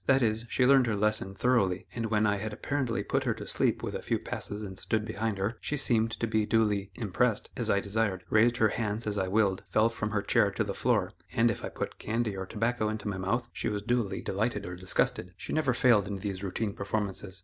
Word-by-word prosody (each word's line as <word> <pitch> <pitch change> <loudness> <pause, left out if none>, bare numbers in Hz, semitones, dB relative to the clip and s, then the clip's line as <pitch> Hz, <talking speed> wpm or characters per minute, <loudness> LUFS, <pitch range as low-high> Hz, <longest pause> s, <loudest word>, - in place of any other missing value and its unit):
That 135 -1 +5
is, 110 +1 +1
she 125 - +2
learned 135 -1 +6
her 110 - +1
lesson 105 -2 0
thoroughly, 100 -6 +2
and 115 -1 -2
when 110 -1 +2
I 105 -1 +2
had 110 +1 -4
apparently 130 0 -1
put - - 0
her - - +1
to - - -7
sleep - - +1
with - - -3
a - - -4
few - - 0
passes 105 +1 -4
and 95 -2 -7
stood 110 -1 -1
behind 110 -1 -2
her, 105 +4 -2
she 150 - -2
seemed 115 -4 +2
to - - +1
be 110 -1 +1
duly 105 -3 +2
"impressed" 110 +2 0
as 120 -4 -2
I 100 -1 +3
desired; 100 -2 -1
raised 115 +2 +4
her 110 -2 +4
hands 110 +1 -2
as 105 -1 -1
I 95 - 0
willed; 100 -1 +2
fell 110 +1 +3
from 110 -2 -3
her 100 -1 -1
chair - - +3
to - - -1
the - - -3
floor; - - +1 0.2
and 115 +1 +4
if - - -6
I - - -3
put - - -5
candy 110 -2 -1
or 95 0 -5
tobacco 115 +1 0
into 110 -1 -4
my 100 -2 -2
mouth, 115 +6 -1
she - - -2
was 105 -1 -3
duly 115 -4 0
delighted 105 +1 -1
or 90 - -5
disgusted. 90 0 0
She - - -5
never 155 -4 +2
failed 120 -5 +4
in 100 - -3
these 95 0 -4
routine 100 +2 -2
performances. 100 -2 -3
110 Hz, 235 wpm, -29 LUFS, 100-115 Hz, 0.2 s, learned